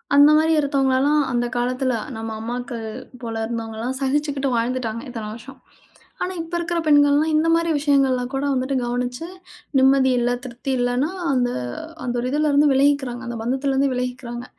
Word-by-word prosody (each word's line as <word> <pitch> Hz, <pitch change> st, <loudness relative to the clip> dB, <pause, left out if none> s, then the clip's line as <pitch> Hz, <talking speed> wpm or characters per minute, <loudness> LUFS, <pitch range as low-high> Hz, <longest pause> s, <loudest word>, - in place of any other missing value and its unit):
அந்த 285 Hz, +1 st, +8 dB
மாரி, 320 Hz, +1 st, +3 dB
இருத்தவங்கல்லாம் 280 Hz, +1 st, +2 dB
அந்தக் 240 Hz, 0 st, -1 dB
காலத்துல, 255 Hz, +1 st, 0 dB, 0.2 s
நம்ம 225 Hz, 0 st, -5 dB
அம்மாக்கள் 240 Hz, +1 st, -5 dB, 0.4 s
போல 230 Hz, -1 st, -5 dB
இருந்தவங்கலாம் 230 Hz, +2 st, -4 dB
சகிச்சுக்கிட்டு 280 Hz, 0 st, 0 dB
வாழ்ந்துட்டாங்க 230 Hz, -1 st, -1 dB
இத்தனை 225 Hz, -3 st, -6 dB
வருஷம். 255 Hz, +4 st, -12 dB, 0.6 s
ஆனா, 365 Hz, -, -2 dB
இப்ப 330 Hz, +1 st, -8 dB
இருக்குற 340 Hz, 0 st, -2 dB
பெண்கள்லாம் 290 Hz, +1 st, +4 dB
இந்த 315 Hz, +2 st, +2 dB
மாரி 335 Hz, 0 st, +1 dB
விஷயங்கள்லாம் 270 Hz, -4 st, +2 dB
கூட 270 Hz, +1 st, -1 dB
வந்துட்டு 260 Hz, +1 st, -1 dB
கவனிச்சு 245 Hz, +4 st, -3 dB, 0.5 s
நிம்மதி 265 Hz, 0 st, +5 dB
இல்ல, 240 Hz, 0 st, +1 dB
திருப்தி 255 Hz, +2 st, -5 dB
இல்லைன்னா 245 Hz, +6 st, 0 dB, 0.2 s
அந்த 250 Hz, -2 st, +1 dB, 0.5 s
அந்த 245 Hz, -1 st, -2 dB
ஒரு 250 Hz, -, -2 dB
இதுல 300 Hz, +2 st, +1 dB
இருந்து 290 Hz, +1 st, +5 dB
விலகிக்கிறாங்க. 270 Hz, -3 st, +1 dB
அந்த, 240 Hz, -1 st, -4 dB
பந்தத்துல 265 Hz, +3 st, -1 dB
இருந்து 275 Hz, +1 st, +2 dB
விலகிக்கிறாங்க. 250 Hz, -1 st, -4 dB
260 Hz, 150 wpm, -22 LUFS, 245-285 Hz, 0.6 s, அந்த